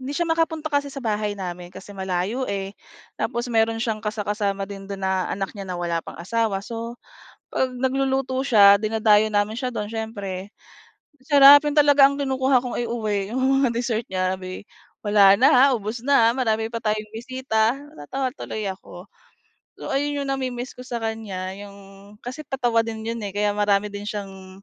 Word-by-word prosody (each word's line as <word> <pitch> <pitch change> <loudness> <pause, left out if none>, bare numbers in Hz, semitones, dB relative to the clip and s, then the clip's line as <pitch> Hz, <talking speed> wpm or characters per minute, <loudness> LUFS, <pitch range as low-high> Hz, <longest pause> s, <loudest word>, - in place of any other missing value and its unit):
hindi 260 +2 -5
siya - - +1
makapunta 325 -1 0
kasi 285 0 +1
sa 275 - -6
bahay 210 -1 -1
namin 180 -2 -6
kasi 195 - -11
malayo 190 +6 -2
eh. 195 0 -4 0.5
Tapos 240 +1 -2
meron 225 0 +2
siyang 225 -2 -1
kasa-kasama 205 -2 -2
din 195 -1 -8
do'n 200 -1 -6
na 190 -1 0
anak 195 0 -3
niya 195 -1 -6
na 180 - -3
wala 170 -1 -1
pang - - -9
asawa 210 +2 -1
so, 230 +1 -6 0.6
'pag 260 -1 0
nagluluto 265 0 0
siya, 205 -6 +7
dinadayo 215 -1 +3
namin 205 +1 +1
siya 255 0 -2
do'n 210 - -3
siyempre, 205 -4 -5 0.7
ang 260 - -26
sarap 285 0 +9
yun 295 - -1
talaga 285 -2 +7
ang 280 - -4
kinukuha 265 -1 +2
kong 250 - -4
i-uwi 215 -4 -2
'yong 265 +1 +2
mga - - +2
dessert 235 -1 -1
niya 185 0 0
'di, 185 +1 -7 0.4
"Wala 200 -1 +6
na, 260 +1 +6
ubos 215 +2 -5
na 255 -5 +5
marami 225 -3 0
pa 230 - -3
tayong 215 0 -2
bisita," 240 -1 0 0.2
natawa 260 - -3
tuloy 215 -1 -5
ako. 180 -1 -11 0.8
So - - -7
ayun 285 +1 0
'yong 275 - -5
na-mi-miss 255 -2 -3
ko - - -7
sa 240 - -3
kanya 205 -4 -4
'yong 200 0 -11 0.4
kasi 255 +5 -6
patawa 240 -4 +1
din 220 -1 -5
'yon 230 +1 -3
eh 200 - -6
kaya 205 0 +1
marami 205 0 +2
din 205 0 -6
siyang 195 -2 -8
220 Hz, 180 wpm, -23 LUFS, 200-260 Hz, 0.8 s, sarap